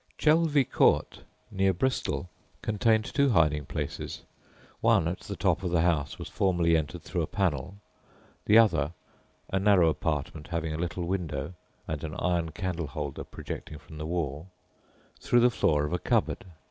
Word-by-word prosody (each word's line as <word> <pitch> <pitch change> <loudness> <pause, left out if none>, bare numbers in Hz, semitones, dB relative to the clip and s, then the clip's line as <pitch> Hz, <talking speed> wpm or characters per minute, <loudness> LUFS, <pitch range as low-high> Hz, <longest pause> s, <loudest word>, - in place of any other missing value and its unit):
Chelvey 150 -2 +4
Court, - - +2 0.3
near 95 -1 +2
Bristol, 90 - -1 0.4
contained 110 0 +2
two 140 -1 +2
hiding 75 - +2
places; - - -5 0.6
one, 80 - +3
at 90 +2 -3
the - - -7
top - - +1
of 90 - -2
the 85 -1 +2
house, 80 -5 0
was - - -7
formerly 85 -3 +2
entered 80 -2 -2
through - - -2
a - - -1
panel, 90 -1 -1 0.7
the 105 - +6
other 85 -9 +4 0.6
(a 95 - +1
narrow 95 -4 +5
apartment 75 -1 -3
having 80 -2 -2
a - - -3
little 85 +1 -2
window, 85 -4 -3 0.3
and 80 -1 -4
an 80 -1 -5
iron 85 -2 0
candle 85 -1 -3
holder 75 -2 -5
projecting 75 - -7
from 75 +1 -12
the 75 - -4
wall) 80 0 -3 0.7
through 120 - +3
the 125 +1 +5
floor 75 -9 +2
of 75 - -4
a 90 - 0
cupboard. - - 0
85 Hz, 160 wpm, -28 LUFS, 75-95 Hz, 0.7 s, the